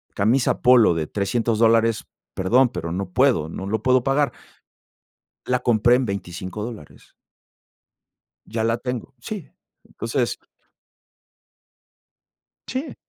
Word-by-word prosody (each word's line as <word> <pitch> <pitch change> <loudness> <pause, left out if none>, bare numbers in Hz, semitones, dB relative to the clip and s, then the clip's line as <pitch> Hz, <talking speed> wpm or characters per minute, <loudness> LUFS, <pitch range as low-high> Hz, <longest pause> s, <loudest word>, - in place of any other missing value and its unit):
camisa 120 +6 +1
polo 125 -7 +6
de 80 -2 -2
$300 110 +2 -1
dólares, 115 -1 +3 0.3
perdón, 120 +7 +3
pero 85 -9 -5
no 95 +1 -3
puedo, 125 - +2
no 95 - -6
lo 110 +1 -1
puedo 130 -1 +3
pagar". 140 +1 +1 1.2
La 125 0 +1
compré 120 0 +3
en 130 -2 -1
$25 95 +1 -5
dólares. 110 -11 -10 1.3
Ya 110 0 -3
la 115 +1 +1
tengo. 125 +1 -5
Sí. 200 - -7 0.3
Entonces - - -2 2.3
Sí. 260 +4 -4
115 Hz, 110 wpm, -22 LUFS, 100-125 Hz, 2.3 s, polo